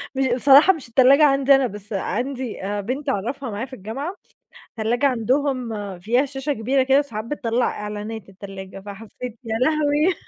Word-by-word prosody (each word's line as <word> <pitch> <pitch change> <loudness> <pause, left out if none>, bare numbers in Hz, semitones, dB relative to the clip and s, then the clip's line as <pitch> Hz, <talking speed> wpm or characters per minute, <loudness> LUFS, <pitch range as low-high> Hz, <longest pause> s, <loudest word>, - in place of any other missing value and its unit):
مش 265 0 +1
بصراحة 280 +8 +6
مش 305 -8 -9
التلاجة 265 +5 +6
عندي 275 0 +5
أنا، 270 -1 +2
بس 210 0 -9
عندي 245 +5 -3 0.2
بنت 270 +7 -3
أعرفها 255 +4 -3
معايا 215 +4 -4
في 265 - -16
الجامعة، 265 - -5 0.6
التلاجة 235 +4 0
عندهم 245 -6 -1
فيها 240 +8 +2
شاشة 275 +1 -3
كبيرة 260 +3 +1
كده 270 +2 +4
ساعات 215 -6 -6
بتطلع 240 -2 -1
إعلانات 210 0 -6
التلاجة، 195 0 -9
فحسيت 220 +4 -9
يا 225 -1 -2
لهوي! 305 +5 +2
250 Hz, 150 wpm, -22 LUFS, 215-275 Hz, 0.6 s, بصراحة